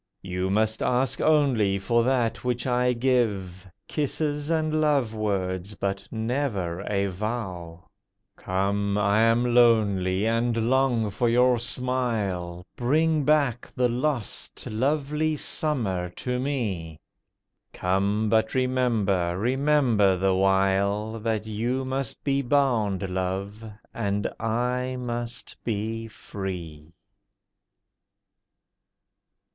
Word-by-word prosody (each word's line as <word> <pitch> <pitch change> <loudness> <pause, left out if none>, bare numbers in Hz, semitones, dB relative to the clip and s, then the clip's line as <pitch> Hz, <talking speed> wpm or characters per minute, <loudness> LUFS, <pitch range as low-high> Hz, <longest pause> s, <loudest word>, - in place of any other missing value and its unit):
You 90 0 -2
must 110 +2 +1
ask 125 +1 +1
only 130 -11 +3
for 115 +4 +1
that 125 -3 0
which 125 -1 -1
I 125 -1 +2
give— 105 -7 0 0.2
Kisses 150 0 -2
and 155 -1 +1
love 140 -7 +2
words, 100 -2 -2
but 100 0 -3
never 110 -7 -2
a 100 -1 +1
vow. 95 -4 -5 0.5
Come! 100 +2 -1
I 105 +1 +3
am 120 +2 +3
lonely, 105 -5 +3
and 115 +1 +1
long 125 -5 +2
for 120 +4 +1
your 125 +1 +4
smile, 110 -9 -2
Bring 155 +4 +2
back 140 -6 +1
the 125 0 +3
lost 125 -2 -2
lovely 150 +6 0
Summer 110 - -2
to 125 -1 -2
me! 100 - -3 0.7
Come! 100 +4 0
but 110 +2 +1
remember, 115 -9 +1
remember 125 -4 +2
the 95 +1 +2
while, 100 +3 +1
That 110 -1 -1
you 120 +5 -2
must 130 -1 -3
be 140 -1 +1
bound, 120 -8 +1
Love, 95 +3 -3 0.3
and 100 0 -1
I 125 +3 -1
must 120 -1 -5
be 115 +1 -3
free. 85 -7 -7
115 Hz, 105 wpm, -26 LUFS, 100-125 Hz, 0.7 s, your